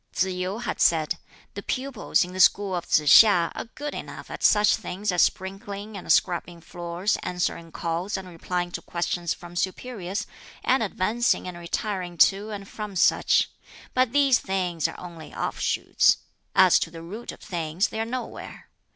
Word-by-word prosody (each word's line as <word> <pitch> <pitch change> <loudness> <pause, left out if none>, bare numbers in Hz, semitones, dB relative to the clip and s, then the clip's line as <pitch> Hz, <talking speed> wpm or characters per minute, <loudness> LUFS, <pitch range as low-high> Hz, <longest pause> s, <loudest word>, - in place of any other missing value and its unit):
Tsz - - +3
yu 185 +3 -3
had 240 - -4
said, 165 0 +3 0.3
"The 200 - -6
pupils 255 -3 0
in 180 - -10
the 185 - -6
school 190 +1 +4
of 175 - -4
Tsz - - +4
hiŠ 170 +3 +7
are - - -5
good 295 +1 -5
enough - - -8
at - - -7
such 210 0 +5
things 200 0 -3
as 180 - +3
sprinkling 200 +2 -2
and 195 - -3
scrubbing 175 -1 +1
floors, 175 +4 -2
answering 170 -2 -3
calls 170 +5 -2
and 190 -1 -7
replying 175 +1 -3
to - - -5
questions 175 0 -2
from 175 0 -12
superiors, 195 +1 -3 0.4
and 260 0 +3
advancing 220 +2 0
and 180 - -6
retiring 175 +1 -4
to 200 +5 +4
and 200 -2 -6
from 210 -2 -7
such; 175 - +3 0.4
but 255 -2 +2
these 275 -3 +4
things 180 -4 -1
are - - -9
only 170 -3 -10
offshoots - - +2 0.4
as - - +7
to - - -2
the 165 0 -10
root 210 +8 -7
of - - -13
things 170 -1 -1
they 220 - -5
are - - +1
nowhere. 245 +2 -7
185 Hz, 170 wpm, -25 LUFS, 175-210 Hz, 0.4 s, hiŠ